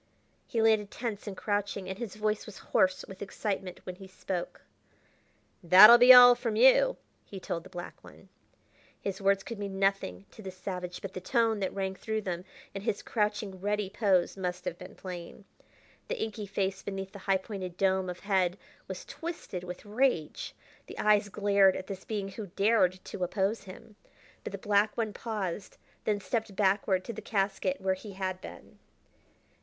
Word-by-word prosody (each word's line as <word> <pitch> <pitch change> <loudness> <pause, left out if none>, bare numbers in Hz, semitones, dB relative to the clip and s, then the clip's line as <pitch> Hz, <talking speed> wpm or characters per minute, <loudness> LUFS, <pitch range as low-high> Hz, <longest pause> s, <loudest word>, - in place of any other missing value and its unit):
He 225 -2 0
landed 215 -2 +3
tense 225 -3 -5
and 195 -2 -6
crouching, 205 -2 -2
and 190 0 -5
his 230 -5 -5
voice 215 0 -1
was 210 - -10 0.2
hoarse 185 0 +3
with 190 0 -11
excitement 195 -2 -4
when 180 -1 -7
he 195 - -11
spoke. 185 -1 -5 1.0
"That'll 195 +7 +10
be 245 +1 +9
all 245 -1 +11
from 240 -3 -3
you," 265 - +5 0.3
he 195 - -9
told 170 -2 -4
the 190 - -13
black 175 -2 -9
one. - - -16 0.7
His 195 0 -4
words 195 0 +2
could 230 -3 -7
mean 200 -1 -4
nothing 195 - 0
to - - -13
this 190 -2 -8
savage, 180 -2 -5
but 195 -1 -6
the 185 - -6
tone 225 +1 +1
that 190 - -1
rang 190 -1 -2
through 220 +3 -3
them, 180 -2 -4 0.3
and 195 - -6
his 205 -2 -2
crouching, 210 -3 -2
ready 205 -1 -1
pose, 195 -4 +2
must 180 -2 -4
have 170 - -4
been - - -11
plain. 180 +1 -8 0.6
The - - -3
inky 215 - -4
face 195 -1 -2
beneath 195 -1 -5
the 200 - -10
high 195 - +5
pointed 185 -3 -7
dome 190 -1 +1
of 180 - -7
head 190 -3 +1 0.3
was - - -7
twisted 325 - -6
with 180 +3 -8
rage; 210 - 0 0.3
the - - -10
eyes 210 -1 +3
glared 200 -2 +4
at 185 - -5
this 190 -1 -7
being 205 -3 -3
who 205 +1 -7
dared 190 -1 +2
to 185 - -5
oppose 195 +3 -1
him. 210 +3 -12 0.5
But - - -5
the - - -5
black 210 0 +1
one 220 -3 -1
paused, 205 -5 -4 0.3
then 210 -1 +1
stepped 220 0 -3
backward 190 -1 +2
to 235 - -5
the 220 - -7
casket 205 +7 -1
where 190 0 +1
he 195 +2 -9
had 185 -1 -3
been. - - -12
195 Hz, 180 wpm, -30 LUFS, 190-215 Hz, 1.0 s, all